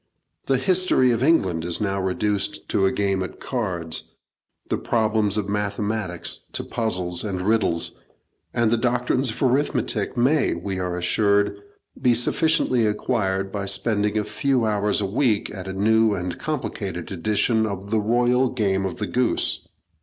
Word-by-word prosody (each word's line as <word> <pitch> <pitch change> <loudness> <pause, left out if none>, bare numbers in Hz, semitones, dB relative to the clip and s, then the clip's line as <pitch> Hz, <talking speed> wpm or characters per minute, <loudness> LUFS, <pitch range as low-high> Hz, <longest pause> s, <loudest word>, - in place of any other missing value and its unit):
The 135 - +3
history 180 -4 +3
of 115 -1 0
England 95 - +2
is 85 0 0
now 100 -2 -1
reduced 100 +2 -1
to 95 - +2
a - - +1
game 100 -2 0
at 95 - -6
cards, 90 -10 -3 0.5
the - - -1
problems 110 -3 +1
of 105 -2 -1
mathematics 105 -2 -2
to - - 0
puzzles 90 -6 -1
and 100 -4 -3
riddles, 95 -4 +1 0.6
and 115 -2 +1
the 120 - +3
doctrines 125 +2 +1
of 110 - -3
arithmetic 125 -5 0
may, 135 - +2
we 95 +2 -4
are 90 -1 -2
assured, 100 +3 +1 0.4
be 125 -1 +4
sufficiently 130 -2 +2
acquired 95 -3 -1
by 100 -1 -3
spending 105 +1 +1
a 105 - +1
few 130 +1 0
hours 105 -1 +1
a - - 0
week 110 +1 0
at 95 -2 -7
a - - -3
new 110 +2 +3
and 90 -1 -4
complicated 100 - -4
edition 105 +4 +1
of 100 0 -6
the 110 - +3
Royal 120 +3 +2
Game 95 -6 0
of 90 - -5
the - - -2
Goose. - - 0
105 Hz, 155 wpm, -23 LUFS, 95-120 Hz, 0.6 s, be